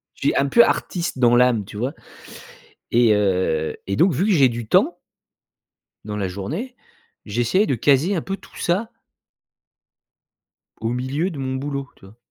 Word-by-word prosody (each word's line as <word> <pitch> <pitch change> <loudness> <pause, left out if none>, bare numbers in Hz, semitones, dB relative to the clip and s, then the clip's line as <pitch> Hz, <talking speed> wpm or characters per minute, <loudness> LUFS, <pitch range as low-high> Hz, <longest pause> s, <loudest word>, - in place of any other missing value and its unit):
je - - -22
suis - - -1
un 140 - +2
peu 235 +11 +6
artiste 175 -5 -2
dans 120 -1 +4
l'âme, 125 -4 +3
tu 105 - -10
vois? 130 +7 -2 1.0
Et 115 -2 +4
heu, 95 -6 0
et 100 - -1
donc 180 +1 +4
vu 160 +9 0
que 215 - +2
j'ai 140 -7 +5
du 115 -1 -6
temps - - +2 1.1
dans 105 -1 -5
la 100 -2 -1
journée, 155 - -5 0.5
j'essayais 120 - +1
de 135 - 0
caser 145 - +2
un 165 - -1
peu 195 0 -4
tout - - -18
ça 195 +6 -1 1.9
au 115 - -2
milieu 130 +9 -2
de 145 - -8
mon 130 -1 -3
boulot, 140 0 -4
tu - - -18
vois? 100 +4 -17
130 Hz, 170 wpm, -21 LUFS, 110-165 Hz, 1.9 s, peu